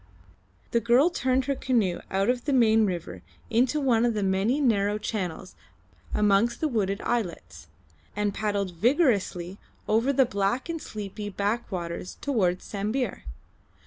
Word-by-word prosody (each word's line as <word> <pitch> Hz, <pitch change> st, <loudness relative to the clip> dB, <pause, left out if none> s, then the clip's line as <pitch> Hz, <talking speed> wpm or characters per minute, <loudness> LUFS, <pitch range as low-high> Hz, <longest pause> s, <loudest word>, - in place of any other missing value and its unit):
The 235 Hz, -, +3 dB
girl 245 Hz, +9 st, +4 dB
turned 260 Hz, -4 st, +1 dB
her 280 Hz, -, 0 dB
canoe 230 Hz, -10 st, 0 dB
out 195 Hz, +1 st, 0 dB
of 245 Hz, 0 st, 0 dB
the 290 Hz, -, 0 dB
main 220 Hz, -4 st, +4 dB
river 175 Hz, -3 st, -5 dB, 0.3 s
into 250 Hz, +6 st, +2 dB
one 245 Hz, -5 st, +2 dB
of 235 Hz, -2 st, +1 dB
the 210 Hz, -, 0 dB
many 195 Hz, +8 st, +1 dB
narrow 210 Hz, -6 st, +2 dB
channels 190 Hz, -4 st, -4 dB, 0.6 s
amongst 210 Hz, +3 st, +2 dB
the 315 Hz, -, +1 dB
wooded 200 Hz, -7 st, -1 dB
islets, 225 Hz, -8 st, -3 dB, 0.5 s
and 205 Hz, -1 st, 0 dB
paddled 205 Hz, -3 st, -1 dB
vigorously 200 Hz, -, +1 dB, 0.3 s
over 230 Hz, +5 st, +2 dB
the 265 Hz, -1 st, +4 dB
black 235 Hz, -, -1 dB
and 330 Hz, -2 st, -3 dB
sleepy 205 Hz, 0 st, -6 dB
backwaters 195 Hz, -4 st, -3 dB
towards 190 Hz, -10 st, 0 dB
Sambir. 215 Hz, +3 st, -3 dB
215 Hz, 140 wpm, -26 LUFS, 195-250 Hz, 0.6 s, girl